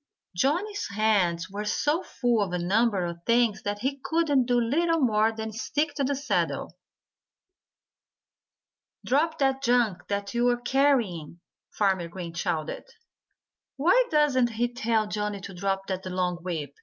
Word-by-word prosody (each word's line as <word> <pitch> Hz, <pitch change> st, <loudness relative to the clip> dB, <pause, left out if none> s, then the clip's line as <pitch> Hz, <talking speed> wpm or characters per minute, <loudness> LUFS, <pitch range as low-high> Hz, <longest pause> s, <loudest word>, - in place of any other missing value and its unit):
Johnnie's 360 Hz, -, 0 dB
hands 200 Hz, -5 st, +1 dB
were 200 Hz, +2 st, -5 dB
so 295 Hz, -, 0 dB
full 240 Hz, -, 0 dB
of 190 Hz, -3 st, -2 dB
a -, -, +1 dB
number 195 Hz, +2 st, +1 dB
of 170 Hz, 0 st, -5 dB
things 230 Hz, -2 st, +2 dB
that 205 Hz, 0 st, -3 dB
he 275 Hz, +3 st, -2 dB
could 295 Hz, -6 st, +2 dB
do 245 Hz, -1 st, +3 dB
little 330 Hz, +8 st, +1 dB
more 220 Hz, -4 st, +3 dB
than 220 Hz, 0 st, -5 dB
stick 290 Hz, +7 st, -2 dB
to 285 Hz, -, -1 dB
the 280 Hz, +1 st, 0 dB
saddle. 280 Hz, +2 st, -2 dB, 2.3 s
"Drop 315 Hz, +5 st, +1 dB
that 270 Hz, -1 st, +1 dB
junk 235 Hz, -8 st, +1 dB
that 200 Hz, +1 st, -3 dB
you're 240 Hz, 0 st, +2 dB
carrying!" 245 Hz, -, +1 dB, 0.3 s
Farmer 190 Hz, -4 st, 0 dB
Green 170 Hz, -1 st, -7 dB
shouted. 170 Hz, -3 st, -3 dB, 0.9 s
"Why 425 Hz, -, +4 dB
doesn't 265 Hz, -6 st, +2 dB
he 240 Hz, +2 st, -1 dB
tell 225 Hz, -2 st, +1 dB
Johnnie 210 Hz, -1 st, -3 dB
to 195 Hz, -, -8 dB
drop 195 Hz, +1 st, -2 dB
that 190 Hz, -1 st, -4 dB
long 180 Hz, -1 st, -1 dB
whip?" 165 Hz, -5 st, -5 dB
225 Hz, 145 wpm, -26 LUFS, 190-270 Hz, 2.3 s, Why